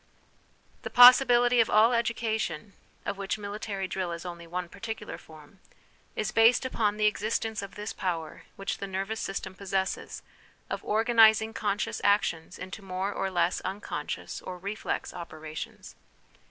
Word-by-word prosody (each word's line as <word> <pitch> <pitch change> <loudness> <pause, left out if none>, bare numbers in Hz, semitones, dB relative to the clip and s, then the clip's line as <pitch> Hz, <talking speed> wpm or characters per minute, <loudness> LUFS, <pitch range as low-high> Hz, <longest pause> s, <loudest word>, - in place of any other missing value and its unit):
" - - -35
The - - -5
possibility 245 -1 +7
of 230 - +4
all 225 +3 +5
education 225 -3 -1 0.3
(of 200 0 -3
which 195 +1 -2
military 205 -1 -4
drill 185 -2 -3
is 170 +1 -7
only 170 -1 -7
one 180 +1 -4
particular 220 +5 -7
form) 155 +4 -16 0.6
is 215 - -1
based 225 +3 +5
upon 210 -5 0
the 215 - +2
existence 215 +1 0
of 200 -1 -9
this 210 +1 -5
power 165 -5 -3
which 195 0 -4
the 200 - -4
nervous 195 +4 -3
system 195 -1 -4
possesses, 190 0 -3 0.5
of - - -3
organising 220 0 +4
conscious 205 -1 -2
actions 185 -4 +1
into 185 +3 -8
more 190 +1 -3
or 195 - -2
less 175 -1 +1
unconscious, 195 +3 -5
or 180 - -7
reflex, 200 +4 -4
operations. 155 -3 -8
200 Hz, 145 wpm, -28 LUFS, 185-220 Hz, 0.6 s, possibility